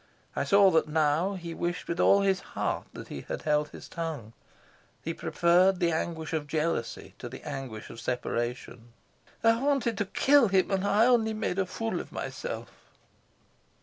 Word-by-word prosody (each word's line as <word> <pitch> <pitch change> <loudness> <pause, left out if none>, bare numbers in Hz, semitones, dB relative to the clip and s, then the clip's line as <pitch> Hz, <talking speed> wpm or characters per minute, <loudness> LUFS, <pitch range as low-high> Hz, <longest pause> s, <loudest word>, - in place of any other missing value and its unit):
I - - 0
saw 200 -1 +6
that 160 -2 +3
now 155 +5 +1
he 170 -2 -6
wished 175 +1 -3
with 170 +1 -3
all 200 - +5
his 195 -1 +2 0.2
heart - - -1
that - - -9
he - - -6
had - - -6
held 150 -1 +1
his - - -11
tongue. 155 -10 -5 0.7
He 165 - -2
preferred 175 +3 +3
the 170 -2 +2
anguish 160 0 -3
of 155 -2 -2
jealousy 155 -5 -2
to 120 - -6
the 130 - -10
anguish 130 -6 -6
of 115 - -10
separation. 120 -1 -3 0.5
"I 230 +1 +4
wanted 270 -6 +1
to 205 - +1
kill 275 +5 +4
him, 190 0 +2
and 190 -1 +1
I 210 +3 +4
only 230 -3 +3
made 215 -3 -2
a 190 - +1
fool 225 +4 -3
of - - -8
myself." - - -5
170 Hz, 175 wpm, -28 LUFS, 150-200 Hz, 0.7 s, saw